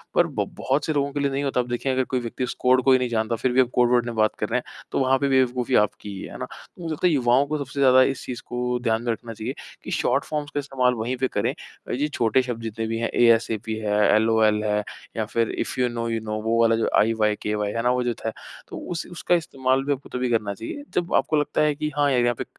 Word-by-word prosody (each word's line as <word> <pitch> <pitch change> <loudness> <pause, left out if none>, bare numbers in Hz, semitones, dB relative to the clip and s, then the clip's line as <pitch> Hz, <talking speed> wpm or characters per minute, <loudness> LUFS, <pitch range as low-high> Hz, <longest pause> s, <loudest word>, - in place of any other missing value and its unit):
पर - - +4
ब - - -2
बहुत 140 +2 0
से 155 - 0
लोगों 140 -1 0
के 145 - -2
लिए 140 -1 +1
नहीं 135 +1 -1
होता। 135 -2 0
अब 125 - 0
देखिए 120 +2 -1
अगर 130 0 +1
कोई 130 0 -2
व्यक्ति 120 +2 -4
उस 125 - -2
कोड 130 0 +4
को 135 - +4
ही 130 - +7
नहीं 125 -1 -1
जानता 115 0 0
फिर 125 +3 0
भी 130 +1 +5
आप 125 - +2
कोड 120 -1 +4
वर्ड 120 -1 +3
में 120 -1 -4
बात 110 -1 +2
कर 105 - -1
रहे 125 - +1
हैं - - -13
तो - - 0
वहाँ 130 0 +3
पे 140 - +1
भी 135 -1 +3
बेवकूफ़ी 125 0 +1
आपकी 105 0 +1
ही 100 -1 -7
है। - - -8
है - - -8
ना? - - -3
तो - - -15
मुझे 165 - -3
लगता 170 +4 +1
है 175 - +2
युवाओं 130 0 +3
को 155 - -1
सबसे 140 -1 -6
ज़्यादा 130 -1 +6
इस 135 - -10
चीज़ 125 - -5
को 125 0 -2
ध्यान 110 -1 +1
में 120 - 0
रखना 115 +1 -6
चाहिए 115 +4 -5 0.3
कि - - -7
शॉर्ट 135 +3 +1
फ़ॉर्म्स 150 -1 -3
का 145 - 0
इस्तेमाल 130 -3 +1
वहीं 120 +2 -2
पे 130 +1 +1
करें। - - -1 0.4
ये 145 +4 0
छोटे 120 +3 +2
शब्द 125 -2 -5
जितने। 115 +1 -2
एएसएपी 115 -2 +2
है 105 -1 0 0.2
एलओएल 110 -1 +3 0.6
या 110 - 0
फिर 115 +1 0
if - - -3
you 125 - +3
know 115 -1 -3
you 115 - -1
know 110 0 -3
वो 115 +1 +1
वाला 115 0 +4
जो 115 - 0
आईवायकेवाय 105 -1 +1
है 115 - -1
ना 125 - +3
वो 125 0 +1
जो 120 -1 0
था। 115 - -4 0.4
तो - - -8
उस 170 - -3
उसका 175 0 +1
इस्तेमाल 135 -5 0
भी 145 - +1
आपको 140 0 -9
तभी 125 0 -1
करना 110 -4 0
चाहिए 115 - -7
जब 175 -1 -1
आपको 140 +3 +2
लगता 150 - 0
है 150 -1 +2
कि 150 +1 -2
हाँ 145 -1 +3
यार 125 - +3
यहाँ 120 0 +2
पे - - -3
125 Hz, 275 wpm, -24 LUFS, 115-135 Hz, 0.6 s, ही